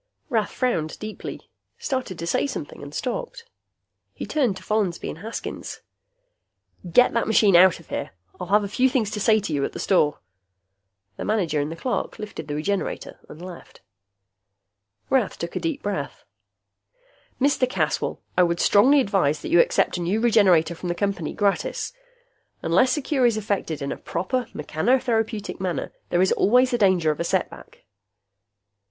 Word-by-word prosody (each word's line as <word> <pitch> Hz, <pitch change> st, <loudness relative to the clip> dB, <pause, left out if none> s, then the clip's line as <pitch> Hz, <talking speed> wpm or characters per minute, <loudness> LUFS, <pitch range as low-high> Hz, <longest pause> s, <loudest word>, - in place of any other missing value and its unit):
Rath 220 Hz, -3 st, +1 dB
frowned 170 Hz, -12 st, -1 dB
deeply, 215 Hz, 0 st, -8 dB, 0.3 s
started 255 Hz, -, -3 dB
to 170 Hz, -, -5 dB
say 170 Hz, -, +1 dB
something, 270 Hz, -, -6 dB
and -, -, -9 dB
stopped. -, -, -4 dB, 0.7 s
He -, -, -5 dB
turned 250 Hz, -11 st, 0 dB
to -, -, -12 dB
Follansby 205 Hz, -5 st, -1 dB
and 160 Hz, -, -7 dB
Haskins. 225 Hz, +5 st, -6 dB, 1.1 s
"Get 250 Hz, +8 st, +5 dB
that 230 Hz, -, 0 dB
machine 210 Hz, -3 st, +4 dB
out 180 Hz, 0 st, +6 dB
of 170 Hz, -, -18 dB
here. -, -, -3 dB, 0.3 s
I'll 180 Hz, -, -5 dB
have 205 Hz, +3 st, +3 dB
a -, -, -2 dB
few 255 Hz, +6 st, +2 dB
things 240 Hz, -6 st, 0 dB
to 210 Hz, -, -3 dB
say 220 Hz, +1 st, +4 dB
to 195 Hz, -6 st, -4 dB
you 140 Hz, -1 st, 0 dB
at -, -, -2 dB
the -, -, -6 dB
store." 150 Hz, -6 st, +2 dB, 1.0 s
The -, -, -4 dB
manager 180 Hz, -8 st, 0 dB
and 145 Hz, +2 st, -3 dB
the -, -, -5 dB
clerk 245 Hz, +9 st, -3 dB
lifted 210 Hz, -1 st, -7 dB
the 145 Hz, -, -3 dB
Regenerator 195 Hz, +6 st, -3 dB
and 160 Hz, -, -11 dB
left. 180 Hz, -2 st, -12 dB, 1.3 s
Rath 255 Hz, -7 st, +1 dB
took 170 Hz, -, -6 dB
a -, -, 0 dB
deep 320 Hz, -4 st, -3 dB
breath. 205 Hz, -1 st, -4 dB, 1.2 s
"Mr. 265 Hz, -2 st, +2 dB
Caswell, -, -, -1 dB
I -, -, +4 dB
would 170 Hz, -1 st, +2 dB
strongly 270 Hz, +8 st, +5 dB
advise 180 Hz, -, +1 dB
that -, -, -4 dB
you 175 Hz, -, +6 dB
accept -, -, +1 dB
a -, -, -3 dB
new 185 Hz, +6 st, 0 dB
Regenerator 195 Hz, -8 st, +4 dB
from 175 Hz, +1 st, -6 dB
the 175 Hz, -, -1 dB
Company, 195 Hz, -5 st, -2 dB
gratis. 205 Hz, -, -1 dB, 0.7 s
Unless 255 Hz, +2 st, +3 dB
a 295 Hz, -, -3 dB
cure 265 Hz, -5 st, +2 dB
is 230 Hz, -2 st, +1 dB
effected 195 Hz, -8 st, -2 dB
in 140 Hz, -, -3 dB
a -, -, -4 dB
proper 220 Hz, +8 st, -2 dB
mechanotherapeutic 225 Hz, -, 0 dB
manner, 185 Hz, -2 st, -3 dB, 0.2 s
there 175 Hz, +1 st, +3 dB
is 190 Hz, -, +2 dB
always 250 Hz, +5 st, +4 dB
the 240 Hz, -, 0 dB
danger 185 Hz, -6 st, +3 dB
of 150 Hz, -, -5 dB
a -, -, 0 dB
setback." -, -, -3 dB
205 Hz, 170 wpm, -24 LUFS, 175-245 Hz, 1.3 s, out